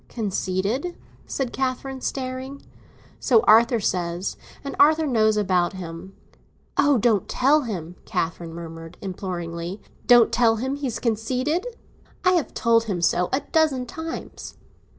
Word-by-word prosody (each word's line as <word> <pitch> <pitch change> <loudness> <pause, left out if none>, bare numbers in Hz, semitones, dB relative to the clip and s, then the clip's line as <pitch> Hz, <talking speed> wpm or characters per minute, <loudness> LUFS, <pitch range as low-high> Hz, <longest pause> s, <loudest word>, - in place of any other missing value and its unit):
"Conceited?" 210 - -2 0.3
said 265 -3 -3
Catherine, 265 0 -3
staring. 260 +1 -4 0.6
"So 235 -5 +4
Arthur 230 +2 +5
says, 180 -2 -2 0.3
and 280 - -5
Arthur 310 +2 +5
knows 220 -5 +2
about 185 -3 +1
him." 180 +1 -8 0.6
"Oh, 285 -1 +4
don't 215 -3 +2
tell 285 +4 +3
him!" 180 -6 -5
Catherine 170 -2 -3
murmured 165 0 -9
imploringly. 175 -1 -5 0.3
"Don't 240 -2 +7
tell 230 -2 +3
him 260 +5 -2
he's 265 -5 -3
conceited? 255 - -1 0.6
I 365 - +6
have 345 -5 0
told 230 -1 +3
him 195 -5 -2
so 175 +1 +2
a 265 - +1
dozen 300 -6 +2
times." 320 +5 -7
230 Hz, 130 wpm, -24 LUFS, 185-265 Hz, 0.6 s, Don't